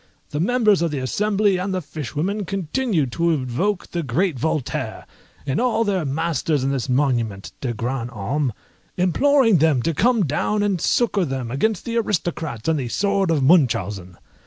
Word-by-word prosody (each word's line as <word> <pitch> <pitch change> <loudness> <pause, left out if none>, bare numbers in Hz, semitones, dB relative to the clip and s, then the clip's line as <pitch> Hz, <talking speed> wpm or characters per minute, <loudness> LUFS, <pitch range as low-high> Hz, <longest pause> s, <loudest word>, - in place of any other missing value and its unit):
The 145 - -2
members 210 0 +3
of 170 - +1
the 150 - -3
Assembly, 200 - +1
and 185 +1 -2
the - - 0
fishwomen, 155 - -3
continued 185 - -1
to 170 +5 +1
invoke 160 +7 -1
their 170 - -2
great 155 +2 0
Voltaire, 155 -3 -2 0.4
and 135 - 0
all 240 -2 +2
their 195 -6 0
masters 150 0 0
in 135 - 0
this 135 -1 -2
monument 120 -7 0
de 130 - -1
grands 120 +1 -3
hommes, 120 +6 -1 0.5
imploring 225 - +4
them 150 -5 +2
to 165 - 0
come 230 - +2
down 205 +8 0
and 195 -5 0
succour 210 -5 +2
them 130 -6 -3
against 200 - 0
the 235 0 -2
Aristocrats 170 - -2
and 160 -2 +2
the 125 - -3
sword 200 - 0
of 155 -5 +2
Munchausen. 105 - +2
160 Hz, 165 wpm, -22 LUFS, 130-200 Hz, 0.5 s, imploring